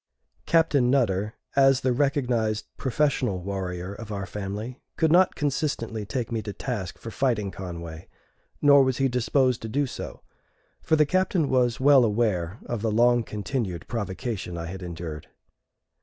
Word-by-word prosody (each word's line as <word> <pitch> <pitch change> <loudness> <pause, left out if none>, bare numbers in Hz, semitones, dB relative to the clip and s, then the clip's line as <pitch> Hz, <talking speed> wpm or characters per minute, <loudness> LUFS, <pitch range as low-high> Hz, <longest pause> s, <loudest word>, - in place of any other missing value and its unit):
Captain 150 -6 +3
Nutter, 110 -5 +1 0.2
as 135 -1 +5
the 130 -1 +2
recognized 120 -6 0
professional 130 -6 0
warrior 90 0 -4
of 110 +1 -9
our 100 -1 -3
family, 105 +5 -6 0.2
could 160 -1 +3
not 180 +2 +5
consistently 125 -7 -2
take 120 -2 -3
me 115 -1 -1
to 105 -1 -6
task 105 -8 -4
for 115 - -8
fighting 110 -7 0
Conway; 85 -3 -7 0.6
nor 140 -1 +7
was 130 -1 0
he 135 - +2
disposed 125 0 +1
to 110 - -5
do 145 +5 +1
so; 130 - -7 0.6
for 160 - +2
the 150 -1 +4
Captain 185 -2 +1
was 125 -2 +2
well 135 -1 +6
aware 105 -5 0
of 120 -3 -3
the 115 - 0
long 120 +2 +4
continued 105 - -4
provocation 100 -4 -4
I 85 - -4
had 95 +3 -7
endured. 85 -3 -6
115 Hz, 155 wpm, -26 LUFS, 100-135 Hz, 0.6 s, nor